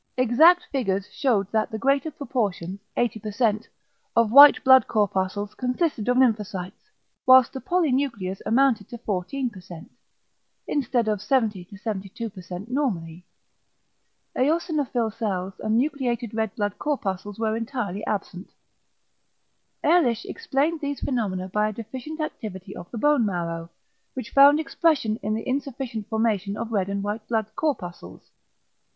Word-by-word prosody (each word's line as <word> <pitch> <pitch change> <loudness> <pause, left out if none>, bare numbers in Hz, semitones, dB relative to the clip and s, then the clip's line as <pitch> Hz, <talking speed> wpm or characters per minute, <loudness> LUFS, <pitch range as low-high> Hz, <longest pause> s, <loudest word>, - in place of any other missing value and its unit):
Exact 315 +9 +5
figures 200 -8 -1
shewed 210 -8 0
that 220 -1 +1
the 220 - -4
greater 275 +6 +1
proportion 205 - -3 0.2
(80%) 220 -1 0 0.5
of 230 -2 +3
white 285 +3 +9
blood 260 -3 +7
corpuscles 205 -1 -1
consisted 250 -2 -1
of 250 - +3
lymphocytes, 210 - 0 0.4
whilst 260 -1 +7
the 265 - -6
polynuclears 265 - 0
amounted 230 -3 +2
to 240 - -7
14% 190 -4 -5 0.8
(instead 245 -5 0
of 210 -2 0
70 210 -5 0
72% 195 -1 -6
normally). 180 - -3 1.1
Eosinophil 285 - 0
cells 190 -4 -3
and 220 +1 0
nucleated 250 -5 -1
red 220 -2 -2
blood 205 -2 -2
corpuscles 205 -9 -3
were 220 -1 0
entirely 225 -4 -4
absent. 195 -2 -4 1.3
Ehrlich 280 -9 +3
explained 300 +4 -1
these 285 -1 -3
phenomena 200 -8 -2
by 210 +3 0
a - - -6
deficient 260 +8 -7
activity 205 - -6
of 175 - -9
the 235 - -7
bone 295 +1 +3
marrow, 170 -4 -3 0.5
which 255 -4 -6
found 285 +2 +7
expression 280 -7 +1
in 215 -2 -2
the 225 - -5
insufficient 260 -5 -3
formation 215 -3 0
of 230 - -5
red 195 -3 0
and 200 0 -2
white 210 +1 -4
blood 220 -2 -1
corpuscles. 175 - -4
225 Hz, 125 wpm, -24 LUFS, 200-265 Hz, 1.3 s, white